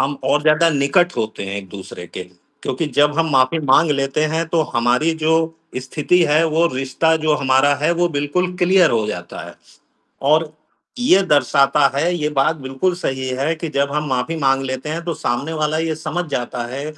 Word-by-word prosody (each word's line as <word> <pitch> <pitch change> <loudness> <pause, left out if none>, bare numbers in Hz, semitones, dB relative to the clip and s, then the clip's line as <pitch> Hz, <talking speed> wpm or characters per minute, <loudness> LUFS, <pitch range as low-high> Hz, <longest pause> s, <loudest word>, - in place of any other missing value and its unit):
हम 135 +1 -1
और 150 - +2
ज़्यादा 155 +2 +4
निकट 150 +5 +1
होते 110 -2 -3
हैं 100 +1 -5
एक-दूसरे 95 -2 -9
के, 90 - -7 0.4
क्योंकि 130 +5 -2
जब 145 0 +4
हम 160 -1 +1
माफी 135 +4 +2
माँग 150 +4 +4
लेते 135 +1 0
हैं 165 0 -1
तो 165 -2 +1
हमारी 125 +7 +2
जो 160 0 0 0.5
स्थिति 155 +7 +1
है, 155 +3 +3
वो 165 +2 +2
रिश्ता 135 +5 0
जो 155 -1 +1
हमारा 135 +1 +3
है 160 - +3
वो 175 0 +1
बिल्कुल 180 +6 -1
क्लियर 180 -1 +4
हो 110 -2 0
जाता 90 -4 -6
है। - - -12 0.7
और 155 +2 +2 0.5
ये 195 -6 +4
दर्शाता 140 -3 +3
है 170 +5 +1
ये 150 -3 -1
बात 150 +3 +1
बिल्कुल 135 +6 -2
सही 130 -7 -3
है 155 +4 0
कि 165 0 -5
जब 140 0 0
हम 150 0 -2
माफी 130 +6 -2
माँग 135 -1 +1
लेते 130 +2 -5
हैं, 165 +2 -4
तो 170 - -3
सामने 140 0 -3
वाला 155 0 -1
ये 160 -1 -1
समझ 175 +2 -3
जाता 120 -2 -3
है 140 +2 -5
150 Hz, 190 wpm, -19 LUFS, 135-165 Hz, 0.7 s, ज़्यादा